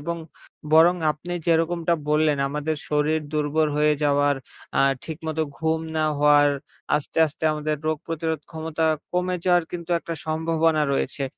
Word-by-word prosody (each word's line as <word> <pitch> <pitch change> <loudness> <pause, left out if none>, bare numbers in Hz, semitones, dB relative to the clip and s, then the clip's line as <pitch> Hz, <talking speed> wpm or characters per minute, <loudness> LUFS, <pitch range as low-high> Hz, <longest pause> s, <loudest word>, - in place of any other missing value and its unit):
এবং 170 +3 -3 0.6
বরং 165 +3 +7 0.2
আপনি 170 +4 -8
যেরকমটা 170 +1 +2
বললেন, 150 -1 +2
আমাদের 150 +2 -2
শরীর 150 +1 +1
দুর্বল 150 +1 +1
হয়ে 150 0 +3
যাওয়ার, 145 -1 +3 0.4
আ - - +5 0.2
ঠিকমতো 160 0 -3 0.2
ঘুম 160 0 0 0.2
না 155 - +2
হওয়ার, 145 0 +5 0.5
আস্তে, 150 +2 -4
আস্তে 155 +1 -8
আমাদের 150 0 -2
রোগ 155 0 +1
প্রতিরোধ 160 -2 -2
ক্ষমতা 160 0 -3 0.3
কমে 180 0 0
যাওয়ার 175 -2 +3
কিন্তু 175 0 -6
একটা 165 0 -6
সম্ভাবনা 160 0 +1
রয়েছে। 135 0 -1
160 Hz, 140 wpm, -24 LUFS, 150-165 Hz, 0.6 s, বরং